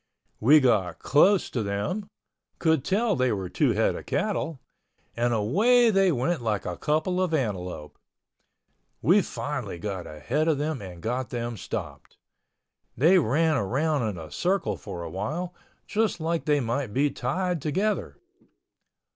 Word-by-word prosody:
We 145 +8 +7
got 105 - +2
close 185 +7 +4
to 120 - -1
them—could 160 - -3
tell 210 +4 +1
they 130 -3 +1
were 95 -3 -3
two - - +2
head - - +1
of - - -8
cattle—and 120 -4 -3
away 215 - +4
they 195 -2 +4
went 150 +3 0
like 110 -3 -1
a 90 - -3
couple 155 - 0
of 175 -4 +1
antelope. 90 - -4 1.0
We - - +5
finally - - -4
got 95 0 -5
ahead 120 - -2
of 160 -3 +2
them 150 -2 -2
and 90 -3 -9
got 125 +3 -2
them 120 -1 -3
stopped. - - -7 0.8
They 170 +9 +6
ran 155 +3 +2
around 140 +7 0
in 100 - -6
a 80 -2 -9
circle 185 - 0
for 90 -5 -7
awhile, 155 - -4 0.3
just 215 -4 0
like 165 +1 -1
they 150 -1 +3
might 120 -1 -2
be 145 +2 +2
tied 175 +7 -2
together. 190 +8 -1
140 Hz, 140 wpm, -26 LUFS, 105-170 Hz, 1.0 s, We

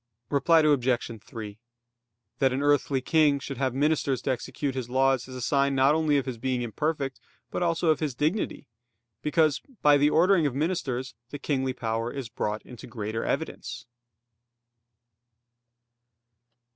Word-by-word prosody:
Reply 160 +3 +4
Obj. 125 -6 +1
3: 105 -2 -8 0.8
That 135 -1 +3
an 135 +2 -1
earthly 145 -2 +2
king 150 +1 +3
should 135 -2 -6
have 130 -2 0
ministers 140 -2 +1
to 135 - +1
execute 135 +2 -3
his 130 -2 -4
laws 130 0 +2
is 130 - -9
a 125 - -6
sign 140 +1 +2
not 135 +2 +4
only 155 -2 +2
of 140 - 0
his 125 -4 -5
being 125 0 -1
imperfect, 135 +3 -2 0.3
but - - -3
also 170 -1 +1
of 155 - +3
his 150 -5 -2
dignity; 155 - -1 0.6
because 155 -1 +2 0.2
by 145 -1 +7
the 145 +1 +4
ordering 170 0 +4
of 130 - -4
ministers 140 -5 -2 0.2
the 145 - -6
kingly 135 -2 -1
power 115 -1 -2
is 135 -4 -6
brought 105 -1 -3
into 125 -2 -11
greater 110 -1 -4
evidence. - - -3
135 Hz, 150 wpm, -27 LUFS, 125-150 Hz, 0.8 s, by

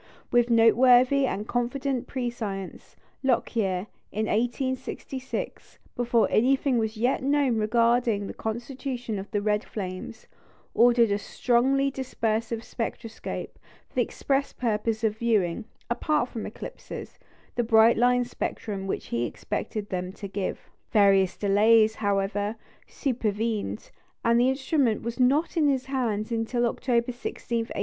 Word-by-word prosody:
With 240 0 +3
noteworthy 250 +4 +5
and 210 -1 -3
confident 250 +1 -1
prescience, 225 -7 -5 0.3
Lockyer, 220 -7 0 0.3
in 215 +1 -1
1866, 260 +3 -3 0.2
before 240 -2 +2
anything 260 +2 +3
was 220 0 -2
yet 245 +4 +1
known 275 -3 +2
regarding 230 -1 +2
the - - -6
constitution 240 -1 -4
of 195 - -8
the 205 -2 -1
"red 210 0 +1
flames," 195 +3 -6 0.5
ordered 235 -2 +5
a 200 - +1
strongly 265 +6 +1
dispersive 230 -3 -2
spectroscope 225 -1 -5 0.3
for - - -32
the - - +2
express 275 0 -1
purpose 225 -1 -1
of 220 -1 0
viewing, 215 -7 +1 0.2
apart 245 +2 0
from 225 - -5
eclipses, - - -8 0.3
the 245 - 0
bright 225 0 +6
line 245 +1 +3
spectrum 200 -4 -4
which - - -4
he 120 0 0
expected 210 - -4
them 180 0 -3
to 200 - -7
give. 195 0 -4 0.2
Various 195 -3 +4
delays, 215 +2 +4
however, 205 +1 0 0.3
supervened, 220 - -2 0.3
and 235 0 +4
the 250 +2 +4
instrument 265 -4 +1
was 235 +2 -4
not 280 +8 +3
in 315 -3 +3
his 265 -2 +1
hands 235 -5 -1
until 235 +1 0
October 240 0 0
16, 240 -1 -4
1868. 225 +1 -4
230 Hz, 130 wpm, -26 LUFS, 210-250 Hz, 0.5 s, bright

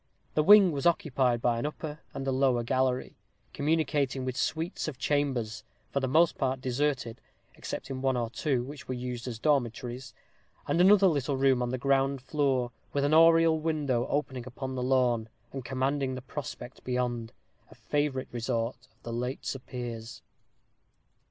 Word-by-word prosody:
This 155 - +2
wing 205 -3 +9
was 140 +1 0
occupied 130 -7 +1
by 120 -1 +2
an 145 - -1
upper 150 0 -6
and 135 - -5
lower 130 -2 +2
gallery, 130 +1 0 0.4
communicating 145 -3 0
with 130 -1 -3
suites 160 +6 -2
of 150 -5 -5
chambers, 125 -7 -1 0.3
for 140 - +1
the 130 - -1
most 160 +5 +3
part 130 -1 0
deserted, 130 -2 -1 0.3
excepting 130 -1 -5
one 135 -1 +1
or 115 -2 -2
two, 125 +1 0
which 140 +2 -9
were 130 - -2
used 125 0 -5
as 120 -3 -4
dormitories; 125 -2 -1 0.5
and 170 - +2
another 195 +1 +7
little 145 -5 +1
room 135 -2 +3
on 120 - -1
the 130 - -2
ground 135 +1 +1
floor, 130 -3 0 0.2
with 140 - +1
an 145 +2 +2
oriel 165 0 +6
window 145 -6 0
opening 130 -4 -2
upon 130 +1 -5
the 130 - -3
lawn, 125 -3 +2 0.2
and 135 -3 -6
commanding 135 0 -1
the 130 - -6
prospect 130 -2 -7
beyond 125 -2 -2 0.4
a - - -15
favorite 145 -3 -1
resort 120 0 -3
of 110 - -37
the 115 - -5
late 125 +3 -3
Sir 135 - -3
Piers. 120 -3 -7
130 Hz, 165 wpm, -29 LUFS, 125-145 Hz, 0.5 s, wing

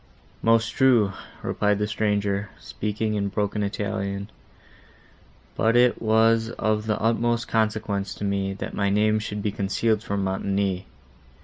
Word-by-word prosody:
"Most 115 0 +3
true," 120 -7 +3 0.3
replied 105 0 +1
the 105 - 0
stranger, 105 -1 -1
speaking 105 +1 -3
in 100 -1 0
broken 105 +1 -1
Italian, 100 0 -3 1.2
"but 115 +1 +2
it 120 0 +4
was 115 0 +3
of 110 0 0
the 105 - 0
utmost 115 +1 +1
consequence 105 -3 -1
to 100 - -7
me, 100 -1 -1
that - - -6
my 100 -1 0
name 105 +2 +2
should 105 -1 -5
be 105 - 0
concealed 105 +2 0
from 100 -3 -2
Montoni. 95 0 -1
105 Hz, 135 wpm, -25 LUFS, 100-110 Hz, 1.2 s, it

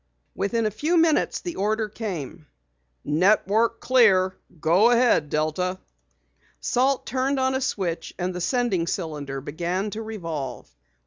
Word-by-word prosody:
Within 230 +3 -1
a 215 - +1
few 310 - 0
minutes 325 -2 +2
the 350 -2 -6
order 215 +2 0
came: 175 - -6 0.6
"Network 210 +8 +2
clear. 195 -7 +4 0.2
Go 175 +9 +4
ahead, 240 -11 +3
Delta." 155 +5 -1 0.8
Salt 265 +2 +1
turned 265 +1 0
on 260 0 +1
a 260 - -1
switch 170 -10 -2
and 180 0 -2
the 180 - -5
sending 210 -6 0
cylinder 145 -6 -4
began 175 +8 -3
to 220 - -5
revolve. 165 - -6
200 Hz, 130 wpm, -24 LUFS, 165-235 Hz, 0.8 s, clear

